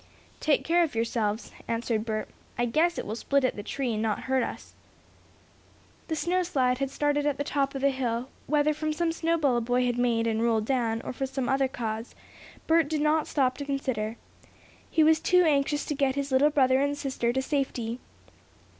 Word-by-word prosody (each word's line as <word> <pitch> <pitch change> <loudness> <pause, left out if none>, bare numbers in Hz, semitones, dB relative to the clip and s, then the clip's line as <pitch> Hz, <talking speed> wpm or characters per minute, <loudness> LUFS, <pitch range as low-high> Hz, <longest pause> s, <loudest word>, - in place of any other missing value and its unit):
"Take 305 -2 +2
care 345 +2 +3
of 320 -7 0
yourselves," 225 -1 -1 0.2
answered 230 -1 -1
Bert. 215 -1 -2 0.3
"I 240 - +1
guess 320 +8 +2
it - - -3
will 215 - -4
split 280 +3 +1
at 255 - +1
the 205 - -5
tree 250 +3 -2
and 215 - -2
not 220 -2 -1
hurt 265 0 +1
us." - - -6 1.3
The 320 - -1
snow 355 +4 +1
slide 260 -8 +1
had 275 -1 -1
started 290 +1 0
at 290 - 0
the 285 - -1
top 275 -1 -1
of 270 - -3
the 280 0 +3
hill, 245 -2 -2 0.2
whether 300 0 +2
from 310 0 -2
some 335 +1 0
snowball 325 -6 +1
a - - +1
boy 245 +2 +1
had 245 0 0
made, 235 -2 +2
and 225 -1 0
rolled 225 -2 +2
down, 230 -3 0
or - - -5
from 270 +2 -3
some 265 -1 -3
other 270 0 +2
cause, 225 -2 -5 0.5
Bert 325 -1 +3
did 305 -1 -1
not 305 +1 +2
stop 260 -3 +1
to 285 - -4
consider. 255 -6 -2 0.7
He 320 - +3
was 315 0 +5
too 360 +2 +4
anxious 290 -2 +1
to - - -2
get 275 -2 +1
his 280 0 -3
little 265 +3 +5
brother 265 -2 +3
and 285 0 0
sister 265 -4 -1
to 265 +2 0
safety. 255 -5 -2
270 Hz, 205 wpm, -27 LUFS, 235-295 Hz, 1.3 s, was